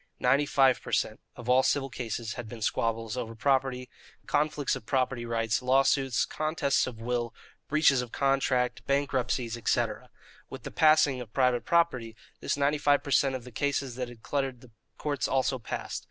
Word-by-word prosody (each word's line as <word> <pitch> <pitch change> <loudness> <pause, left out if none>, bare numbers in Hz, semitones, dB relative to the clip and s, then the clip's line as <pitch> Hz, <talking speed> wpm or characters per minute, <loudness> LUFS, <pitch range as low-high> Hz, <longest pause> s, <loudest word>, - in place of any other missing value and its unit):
Ninety 140 +4 +3
five 135 -3 +3
per - - -9
cent. - - 0 0.2
of 120 - -10
all 125 +1 +5
civil 135 0 0
cases 115 -2 -4
had 120 -3 -7
been 115 -2 -7
squabbles 115 +1 -1
over 115 -2 -5
property, 130 +1 0 0.4
conflicts 150 -1 0
of 110 - -10
property 130 -3 0
rights, 115 -1 0
lawsuits, 135 0 +2
contests 155 -4 0
of 120 -3 -7
wills, 120 0 -2 0.4
breaches 150 -4 +4
of 120 -2 -7
contract, 135 -2 +1
bankruptcies, 130 -4 0
etc. 120 - -1 0.4
With - - -9
the - - -7
passing 155 -4 +4
of 115 -3 -10
private 125 -3 +2
property, 130 -10 +1 0.2
this - - -1
ninety 145 +1 +1
five 145 0 +3
per 140 - -6
cent. 135 -1 +3
of 130 - -6
the 125 - -11
cases 140 +1 -1
that 125 0 -4
cluttered 135 -4 -2
the 125 - -16 0.3
courts 145 -4 -2
also 130 0 0
passed. 115 - -5
130 Hz, 170 wpm, -28 LUFS, 120-140 Hz, 0.4 s, all